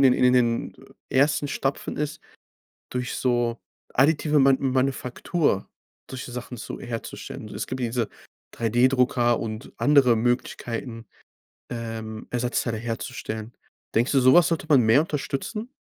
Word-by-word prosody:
in - - +5
den 130 - +7
in 125 0 +4
den 120 -2 +1 0.4
ersten 145 +2 +3
Stapfen 135 0 -2
ist, 150 0 -3 0.7
durch 125 0 -3
so 120 -2 +1 0.4
additive 150 +2 +3
Ma 135 0 +6
Manufaktur 130 - 0 0.4
solche 130 -1 -6
Sachen 125 0 -6
zu - - -7
herzustellen. 120 -2 -6
Also - - -8
es - - -3
gibt 130 - -5
diese 120 -2 -1 0.5
3D-Drucker 120 +1 +2
und 110 +2 -6
andere 140 -5 +5
Möglichkeiten, 115 0 -2 0.6
ähm, 115 -2 -5
Ersatzteile 120 -1 -1
herzustellen. 115 -1 -5 0.4
Denkst 120 +5 +2
du, 135 - +4
so 130 +1 +6
was 175 -1 +6
sollte 165 -2 -1
man 145 -5 +6
mehr 110 +5 +5
unterstützen? 160 - -4
125 Hz, 135 wpm, -25 LUFS, 115-135 Hz, 0.7 s, den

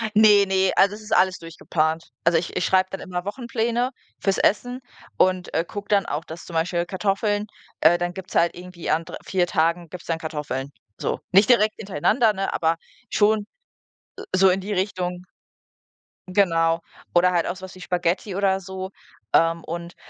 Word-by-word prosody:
Ne, 210 -2 +7
ne, 190 0 +2
also, 200 +1 +4
es 220 - -11
ist 215 - -1
alles 185 0 +3
durchgeplant. 165 -1 -2
Also, 170 0 +4
ich 170 - -6
ich - - 0
schreibe 185 0 +3
dann 195 - -5
immer 180 -1 -5
Wochenpläne 235 +2 -1 0.3
fürs 195 -1 +1
Essen 245 +4 +1 0.4
und, 185 -1 +2
äh, 165 - +2
gucke 205 +3 -7
dann 200 -3 +3
auch, 150 +3 -3
dass 165 +1 -9
zum 170 - -10
Beispiel 170 +1 0
Kartoffeln 205 +2 -1 0.3
äh, 170 +3 +6
dann 175 0 -2
gibt's 190 -1 -9
halt 170 0 +3
irgendwie 180 -1 -8
an 160 +1 +1
dr - - -7
4 180 -2 +1
Tagen 170 -1 0
gibt's 180 0 -10
dann 165 -1 -1
Kartoffeln, 150 -4 -4 0.3
so. - - -2
Nicht 200 +5 +5
direkt 215 -3 +4
hintereinander, 215 - +2
ne, 195 0 -2
aber 165 0 +1 0.3
schon 210 0 +2 0.9
so 190 0 +6
in 190 +2 +1
die 205 +2 -5
Richtung. 180 -2 -2 1.1
Genau. 165 -3 +2 0.3
Oder 180 +1 +5
halt 175 -2 +1
auch 180 - -2
so 190 - -13
was 190 0 -9
wie 185 - -13
Spaghetti 180 +2 -1
oder 195 -1 +2
so. 190 0 -7 0.4
Ähm, 165 0 +3
und 170 +1 -6
185 Hz, 180 wpm, -23 LUFS, 170-200 Hz, 1.1 s, Ne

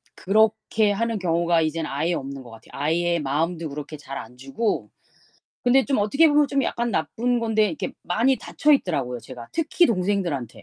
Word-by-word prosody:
그렇게 215 +1 +2
하는 230 +2 -1
경우가 170 -1 +2
이젠 160 0 -1
아예 155 +5 -1
없는 135 -1 -6
것 120 - -13
같아요. 115 0 -15
아예 170 +3 0
마음도 160 +3 -1
그렇게 150 +2 -7
잘 140 -1 -8
안 120 +2 -9
주고. 135 - -2 0.7
근데 255 +2 +4
좀 275 - +1
어떻게 275 +11 +4
보면 295 -1 +3
좀 275 -1 +1
약간 235 0 -1
나쁜 230 +8 0
건데 220 -2 +2
이렇게 165 - -4
많이 235 +9 +2
닫혀 300 +3 +1
있더라고요, 135 - 0
제가 120 -2 -10
특히 330 +2 +2
동생들한테 185 - -1
175 Hz, 375 characters per minute, -24 LUFS, 145-230 Hz, 0.7 s, 근데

